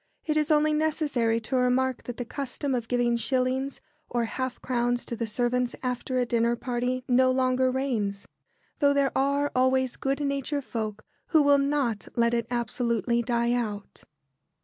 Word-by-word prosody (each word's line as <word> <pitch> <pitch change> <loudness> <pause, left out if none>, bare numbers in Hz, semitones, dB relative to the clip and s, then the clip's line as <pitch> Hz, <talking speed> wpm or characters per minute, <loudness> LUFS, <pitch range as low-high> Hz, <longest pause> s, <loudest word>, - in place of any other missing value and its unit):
It 305 - 0
is 300 -1 +1
only 305 0 +4
necessary 290 -7 +1
to 245 +4 -3
remark 255 0 +1
that 245 - -6
the 245 - -4
custom 275 +2 -3
of 240 -3 -2
giving 240 -1 +1
shillings 260 +2 -1 0.3
or 240 -1 0
half 255 +2 -4
crowns 245 -1 -1
to 235 - -4
the 230 0 -3
servants 245 +2 0
after 250 +1 -2
a 250 - +2
dinner 235 0 +1
party 250 +1 -2
no 255 +1 +4
longer 255 0 +2
reigns; 230 -7 -2 0.5
though 285 -2 +4
there 275 -1 +1
are 280 +2 +1
always 260 0 +2
good 275 +1 -1
natured 280 0 -1
folk 215 -3 -4 0.2
who 315 -3 +4
will 285 0 +5
not 275 -7 0
let 235 0 +2
it 235 -1 0
absolutely 235 0 0
die 235 0 +1
out. 210 -4 -4
250 Hz, 165 wpm, -27 LUFS, 235-275 Hz, 0.5 s, will